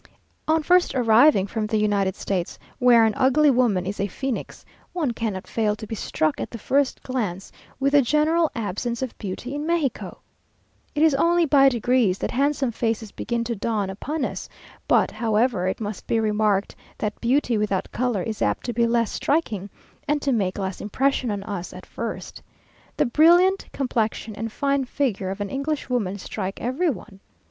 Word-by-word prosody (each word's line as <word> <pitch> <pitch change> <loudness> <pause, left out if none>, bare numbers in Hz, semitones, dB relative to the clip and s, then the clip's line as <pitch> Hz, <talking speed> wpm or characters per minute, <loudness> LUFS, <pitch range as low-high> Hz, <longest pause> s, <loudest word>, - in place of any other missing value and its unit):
On 315 0 +2
first 355 -2 +3
arriving 235 -2 +5
from 215 +1 -3
the 215 - 0
United 200 -3 +1
States, 185 -4 -3 0.2
where 240 -2 +6
an 220 - +2
ugly 280 +3 +4
woman 235 -8 +2
is 200 +2 -4
a 200 - 0
phoenix, 265 +6 -5 0.3
one 315 -8 0
cannot 220 -5 -3
fail 215 -2 0
to 220 - -8
be 220 - -7
struck 155 -7 -1
at - - -4
the 235 - -7
first 275 +4 0
glance 205 -8 -3 0.3
with 275 +1 +2
the 290 - +7
general 310 +5 +2
absence 230 +3 -3
of 255 - -5
beauty 210 +6 -5
in 290 +1 -3
Mexico. 330 -6 -1 0.8
It 295 - +2
is 320 -2 +5
only 340 +4 +3
by 275 -2 +6
degrees 240 -5 +2
that - - -3
handsome 275 -1 +1
faces 225 -2 -2
begin 235 0 -2
to 235 0 -3
dawn 205 -2 -1
upon 285 +9 -3
us; - - -6 0.4
but, - - +3
however, 220 -3 +1
it 185 - -2
must 210 -3 -6
be 230 - +1
remarked 210 -2 +1 0.2
that 210 0 -4
beauty 245 0 +2
without 200 -3 -1
colour 240 -6 -1
is 220 -2 -5
apt 105 0 0
to 240 - -2
be 235 +1 +2
less 230 -2 +1
striking 215 - -1 0.4
and 295 0 +1
to 275 - +1
make 195 -6 0
less 190 -2 -4
impression 260 +4 0
on 200 -2 -3
us 200 -4 -5
at 185 - -10
first. 230 0 -6 0.6
The - - +3
brilliant 345 +9 +4
complexion 225 -4 -2
and 225 +2 -5
fine 275 +2 0
figure 245 -8 -1
of 195 +2 -5
an 200 - -3
Englishwoman 260 -8 -2
strike 195 -1 -5
every 270 +9 0
one. 200 -5 -7
230 Hz, 180 wpm, -24 LUFS, 205-275 Hz, 0.8 s, the